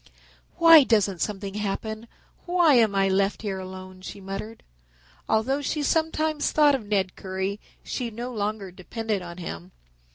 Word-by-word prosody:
"Why 330 -3 +9
doesn't 205 -7 +1
something 200 -2 -3
happen? 215 +2 -4 0.4
Why 350 -4 +4
am 225 -5 +4
I 195 0 +3
left 195 +2 0
here 195 -3 -3
alone?" 185 0 -9
she 195 - -8
muttered. 195 +3 -7 0.7
Although 265 +6 +1
she 295 +1 -2
sometimes 315 0 0
thought 295 -2 +5
of 245 -6 -2
Ned 195 -3 0
Currie, 190 +2 -4 0.2
she 245 -3 -3
no 240 +3 -6
longer 205 -2 -3
depended 210 +3 -4
on 170 0 -9
him. 90 - -7
210 Hz, 150 wpm, -25 LUFS, 190-250 Hz, 0.7 s, Why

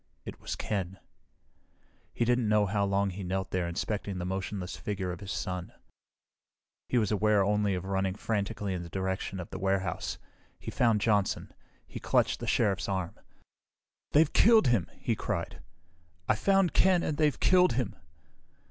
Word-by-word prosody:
It - - -8
was - - -4
Ken. 95 -2 -3 1.1
He 120 - 0
didn't 120 -2 +2
know 105 -1 +4
how 100 +1 0
long 100 0 +1
he 95 +2 -7
knelt 95 +1 -3
there 90 -2 0
inspecting 100 +3 -3
the 90 - -3
motionless 95 0 -4
features 95 -3 -3
of 85 - -8
his 100 -1 -7
son. 90 -3 -4 1.2
He 125 - +1
was 110 -4 +1
aware 105 -1 +3
only 105 -1 +1
of 90 0 -4
running 95 -1 -1
frantically 105 -2 -2
in 90 - -3
the 85 - -8
direction 95 +1 -3
of 90 - -7
the - - -5
warehouse. 95 -1 -1 0.4
He - - -7
found 115 -4 +2
Johnson. 105 -3 0 0.3
He - - -8
clutched - - +1
the - - -5
Sheriff's 100 -1 +1
arm. 95 -3 -2 1.0
"They've 155 0 +4
killed 220 - +6
him!" 115 -8 +1
he - - -1
cried. - - -4 0.7
"I - - +4
found 195 - +2
Ken 185 -2 +4
and 150 - -2
they've 150 -4 +2
killed 180 -5 +4
him!" 120 -4 -2
100 Hz, 165 wpm, -29 LUFS, 95-110 Hz, 1.2 s, killed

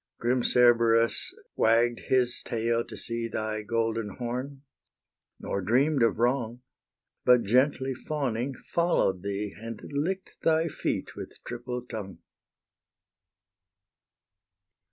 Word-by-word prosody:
Grim 125 +2 +1
Cerberus 115 -2 +4 0.2
wagg'd 115 +1 +3
his 125 -2 +2
tail 115 0 0
to - - -9
see 115 0 -1
Thy 110 -1 -3
golden 115 -1 -1
horn, 130 +3 -5 0.8
nor 100 - -3
dream'd 130 +8 +2
of 115 -1 +3
wrong, 120 0 0 0.6
But 125 -1 +5
gently 130 +4 +2
fawning, 130 -2 -2
follow'd 170 - 0
thee, 100 +1 -3
And 115 0 -7
lick'd 180 +7 -2
thy 160 0 +2
feet - - -3
with - - -8
triple 125 0 -5
tongue. 100 -6 -7
120 Hz, 105 wpm, -28 LUFS, 115-130 Hz, 0.8 s, But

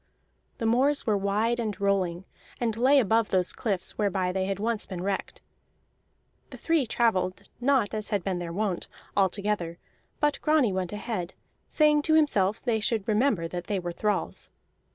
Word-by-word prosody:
The 225 - -3
moors 265 +6 +3
were 215 -3 +2
wide 210 +4 0
and 215 -3 -3
rolling, 190 -3 0 0.3
and 230 -3 0
lay 265 +5 +5
above 225 -1 +2
those 185 -2 +1
cliffs 195 -4 -3
whereby 190 -3 +1
they 190 0 -1
had 195 0 -2
once 220 +1 -1
been 180 -2 -5
wrecked. 195 0 -3 1.1
The - - -10
three 325 -6 +1
travelled 205 -6 0
not 250 -5 +2
as 215 -1 -3
had 205 -4 -1
been 185 -1 -2
their 170 -1 -5
wont, 195 -1 -2 0.3
all 195 -1 +4
together; 195 -4 -2 0.4
but 295 -1 +1
Grani 300 -9 +3
went 185 -2 -2
ahead, 210 -4 -4 0.3
saying 300 -1 +3
to 315 +1 +2
himself 215 -10 +2
they 235 -3 +1
should 220 -2 -1
remember 215 -6 +2
that 175 0 -5
they 205 - 0
were 175 -1 -3
thralls. 205 -1 -2
210 Hz, 170 wpm, -27 LUFS, 190-235 Hz, 1.1 s, lay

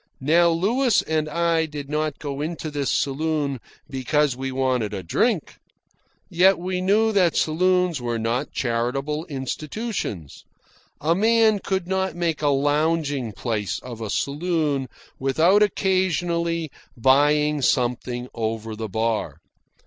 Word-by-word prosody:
Now 170 +5 +4
Louis 215 +8 +2
and 155 -1 -1
I 165 0 +1
did 145 -2 -7
not 150 0 -2
go 140 -1 -5
into 160 0 -4
this 145 -3 -2
saloon 145 -1 -1 0.3
because 135 +1 0
we 135 +1 -4
wanted 130 -4 0
a 95 - -5
drink. 85 - 0 0.7
Yet 185 +3 +4
we 180 +1 -3
knew 215 +4 +3
that 185 -5 +2
saloons 180 -1 +2
were 120 -1 -2
not 115 +5 -2
charitable 135 +7 -2
institutions. 140 - -5 0.6
A 160 +3 +2
man 220 +2 +3
could 190 -2 -2
not 190 0 -1
make 170 -3 -1
a 150 - +1
lounging 145 -2 +1
place 105 -2 -2
of 120 -3 -9
a 110 - -4
saloon 145 - -1 0.3
without 160 +10 +3
occasionally 175 -5 0 0.3
buying 145 +4 +3
something 125 -1 0
over 110 -1 -3
the 110 0 -5
bar. 110 +2 -1
150 Hz, 125 wpm, -23 LUFS, 130-175 Hz, 0.7 s, Now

